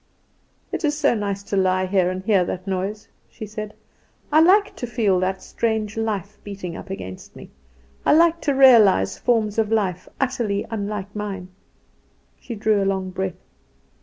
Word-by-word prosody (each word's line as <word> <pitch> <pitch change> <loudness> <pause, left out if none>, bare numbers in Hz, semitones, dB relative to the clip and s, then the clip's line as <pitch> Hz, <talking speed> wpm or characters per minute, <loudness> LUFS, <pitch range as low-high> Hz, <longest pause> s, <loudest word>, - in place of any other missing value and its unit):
"It - - -3
is 295 -1 +1
so 300 -4 +3
nice 200 -3 -3
to 200 - -4
lie 185 -1 +2
here 185 -1 +2
and 185 0 -4
hear 195 -3 +3
that 180 +1 -5
noise," 200 +3 -3 0.2
she 215 - -8
said. 215 0 -7 0.6
"I 305 - +6
like 400 +5 +4
to 245 - -4
feel 215 -6 +1
that 190 +1 -2
strange 220 -2 -2
life 210 -2 -3
beating 195 -4 -6
up - - -9
against 95 - -8
me. - - -12 0.5
I - - +4
like 335 +1 +4
to 285 -2 0
realise 215 - +6
forms 225 -3 +1
of 220 -1 0
life 190 -5 -1
utterly 235 -6 -1
unlike 205 -2 -4
mine." 195 -3 -5 0.9
She 235 - -7
drew 210 -1 +1
a - - +1
long 190 -1 -1
breath. 185 -1 -5
205 Hz, 165 wpm, -22 LUFS, 190-225 Hz, 0.9 s, I